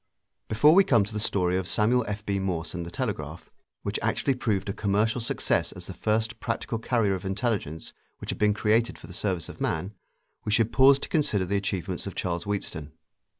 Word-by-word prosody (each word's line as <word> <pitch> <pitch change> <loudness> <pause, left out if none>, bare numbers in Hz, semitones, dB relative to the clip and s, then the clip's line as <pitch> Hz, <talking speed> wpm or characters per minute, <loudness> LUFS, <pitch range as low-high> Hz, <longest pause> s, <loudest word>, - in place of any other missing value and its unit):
Before 115 +9 +5
we 195 +3 +7
come 115 - +4
to 105 +2 -8
the 105 - -2
story 90 -3 +2
of 95 -1 -2
Samuel 120 +4 +3
F.B. 105 -1 -2
Morse 90 -4 -2
and 85 -1 -4
the - - -5
telegraph 85 - -4 0.3
which - - -2
actually 135 - +1
proved 110 -7 -1
a 100 - -1
commercial 105 +4 +1
success 135 +4 0
as - - -9
the - - -7
first 110 +1 -1
practical 115 -1 -2
carrier 115 -4 +1
of 95 0 -4
intelligence 95 -5 -2 0.2
which - - -5
had - - -6
been 105 -1 +3
created 110 +3 +2
for - - -12
the 90 - -11
service 90 -3 -2
of - - -11
man, 90 +6 -1 0.5
we 105 - -2
should 110 +1 +2
pause 135 +1 +7
to - - -6
consider 110 - +1
the 100 +3 -1
achievements 95 -2 -2
of 95 - -6
Charles 85 -2 -2
Wheatstone. 80 -7 -3
105 Hz, 200 wpm, -27 LUFS, 95-115 Hz, 0.5 s, we